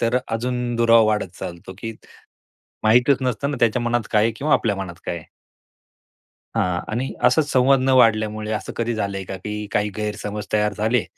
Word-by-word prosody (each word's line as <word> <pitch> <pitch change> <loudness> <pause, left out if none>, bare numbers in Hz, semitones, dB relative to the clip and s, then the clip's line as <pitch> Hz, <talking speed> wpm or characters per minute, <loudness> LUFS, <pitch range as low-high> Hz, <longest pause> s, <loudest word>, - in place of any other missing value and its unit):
तर 115 +2 +2
अजून 120 +1 -2
दुरावा 115 0 +6
वाढत 105 -4 0
चालतो, 85 +2 -7
की 115 +1 -5 0.9
माहितीच 125 +5 +5
नसतं 130 +3 -1
ना 140 - -3
त्याच्या 120 +1 +2
मनात 120 -2 -1
काय 105 -1 +3
आहे 115 - +1
किंवा 150 +2 0
आपल्या 105 -4 +1
मनात 95 -3 -5
काय 85 - -3
आहे? 80 - -10 1.3
हां. 90 -1 +1
आणि 120 +5 -2
असा 160 - +5
संवाद 135 -1 +3
न 130 - 0
वाढल्यामुळे 110 -2 +2
असं 110 - -4
कधी 115 0 -1
झालंय 100 -2 -3
का, 95 - -6
की 105 +3 -5
काही 105 0 +1
गैरसमज 105 -1 -4
तयार 105 0 +2
झाले 110 0 +1
110 Hz, 175 wpm, -22 LUFS, 105-120 Hz, 1.3 s, दुरावा